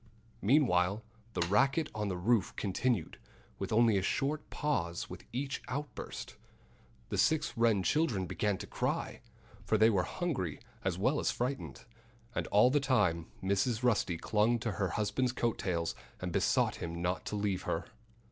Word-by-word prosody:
Meanwhile 105 -5 +3 0.3
the 85 - +1
racket 135 - +3
on 105 -1 -2
the 95 -2 -2
roof 105 +2 +1
continued, 100 -1 -1 0.4
with - - -3
only 115 -1 +5
a - - +2
short 145 +9 -1
pause 85 - -1
between - - -11
each 135 +3 -3
outburst. 145 +3 -5 0.7
The - - -1
six 155 -1 +2
Wren 115 -4 +3
children 120 - +1
began 105 +2 -1
to - - -7
cry - - -2 0.4
for 110 - +2
they 110 +2 +6
were 95 -4 +3
hungry 130 - -2 0.2
as 95 -2 0
well 130 +10 +2
as - - +1
frightened. 130 +3 -3 0.5
And - - -2
all 105 +5 +5
the 145 - +4
time 90 - +2 0.2
Mrs. 100 +5 +1
Rusty 105 -8 +2
clung 110 +6 +2
to 115 - -1
her 100 -1 -1
husband's 110 +4 0
coat 120 -2 -1
tails 85 -3 -1 0.3
and 90 -1 -3
besought - - +2
him 85 0 -5
not 90 +1 -1
to - - -3
leave 100 -3 0
her. 80 - -1
105 Hz, 160 wpm, -32 LUFS, 95-130 Hz, 0.7 s, they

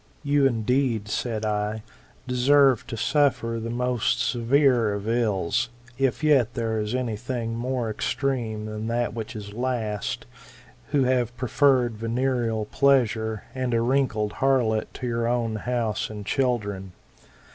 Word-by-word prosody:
"You 145 -1 +3
indeed, 120 -2 0
said 110 -1 -2
I, 105 0 -1 0.4
deserve 130 0 +4
to 115 - -5
suffer 125 -3 +1
the 115 +1 -4
most 125 -1 0
severe 120 -3 +2
of 100 +1 -5
ills, 110 -6 0 0.3
if 135 +2 0
yet 135 -6 +3
there 115 -2 -1
is 105 +3 -2
any 125 -4 -1
thing 120 0 -4
more 125 0 -2
extreme 110 -1 -2
than 110 +1 -5
that 120 0 -1
which 115 0 -6
is 105 -1 -7
last, 115 -4 -2 0.6
who 140 -2 +2
have 125 -2 0
preferred 125 -2 +2
venereal 115 -1 -1
pleasure, 110 -4 +2
and 130 -2 -1
a 115 - +2
wrinkled 115 -4 +1
harlot, 125 -5 +2
to 130 - -5
your 115 -1 -1
own 115 -2 0
house 115 -1 -2
and 105 -2 -7
children. 105 -8 -1
120 Hz, 135 wpm, -25 LUFS, 110-130 Hz, 0.6 s, deserve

